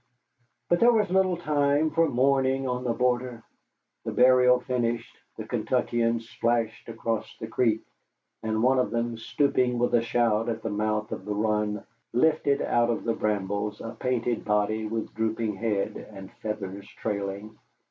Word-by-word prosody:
But 175 - +2
there 240 +1 +6
was 210 -5 +1
little 185 -1 +3
time 150 -1 +1
for 165 0 +3
mourning 135 +1 +2
on 125 0 -2
the 125 - 0
border. 125 -1 0 0.6
The - - -3
burial 125 0 +5
finished, 120 -2 -2 0.2
the - - -6
Kentuckians 115 -1 0
splashed 115 -1 -1
across 115 -1 -3
the - - -5
creek, 110 -1 +1 0.6
and 110 0 -1
one 130 +1 +4
of 125 - +1
them, 120 0 -1
stooping 125 +1 +1
with 120 +1 +1
a 120 - +5
shout 115 -1 +1
at 115 -1 -3
the 115 - -2
mouth 105 +1 -1
of - - -5
the 105 0 -2
run, 105 -1 0 0.3
lifted 140 +1 +2
out 120 0 +2
of 115 - -1
the 115 - 0
brambles 105 0 -2
a 115 - -6
painted 125 -2 -1
body 105 +1 0
with 110 0 -4
drooping 110 -1 -1
head 105 -2 -1 0.2
and 95 -1 -10
feathers 100 -2 -5
trailing. 100 +1 -4
115 Hz, 155 wpm, -27 LUFS, 110-125 Hz, 0.6 s, there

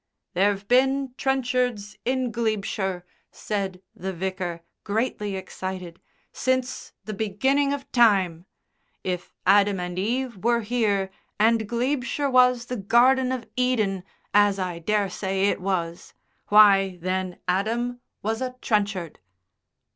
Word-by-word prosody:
"There've 200 +2 +1
been 265 +1 +2
Trenchards 250 -6 -1
in 255 -1 0
Glebeshire," 200 -5 -2 0.3
said 195 -3 -4
the 190 +2 -4
Vicar, 185 -1 -4 0.2
greatly 210 -2 -2
excited, 185 -2 -6 0.3
"since 255 0 -1
the 215 - -4
beginning 265 +8 +1
of 285 -1 -5
time. 190 -8 +3 0.6
If 180 -1 -3
Adam 200 0 +4
and 180 0 -4
Eve 240 +3 -1
were 235 0 +3
here, 205 -4 0 0.3
and 220 0 +3
Glebeshire 265 +3 -1
was 250 -1 +4
the 250 0 -4
Garden 250 +5 +4
of 255 -3 -3
Eden, 220 -7 +1 0.3
as 205 -1 +4
I 180 -3 -3
daresay 195 0 0
it - - -2
was, 175 -3 -3 0.3
why, 195 -3 +6
then 185 +1 -2
Adam 235 +6 -1 0.2
was 220 +3 -1
a 255 -1 -3
Trenchard." 200 -8 -1
210 Hz, 115 wpm, -25 LUFS, 190-245 Hz, 0.6 s, why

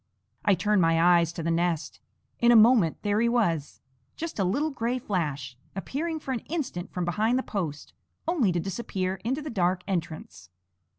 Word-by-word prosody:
I 205 - +4
turned 205 +2 +2
my 165 -1 +3
eyes 170 -1 +4
to 165 - -5
the 165 - 0
nest. 170 -1 -1 0.4
In 240 0 +5
a - - +6
moment 220 -7 +5
there 205 +1 +1
he 235 - +3
was 170 - 0 0.3
just 330 -7 -5
a - - +3
little 280 +12 0
gray 245 -1 -1
flash, 150 - -3 0.2
appearing 315 - -3
for 275 - -5
an 250 - -1
instant 260 - -3
from 180 -1 -2
behind 215 +8 +1
the 260 - -1
post, 160 -8 -4 0.3
only 295 - +2
to 175 - 0
disappear 190 0 -3
into 265 +6 -2
the 300 - -5
dark 180 -3 0
entrance. 155 - -5
195 Hz, 180 wpm, -27 LUFS, 170-240 Hz, 0.4 s, a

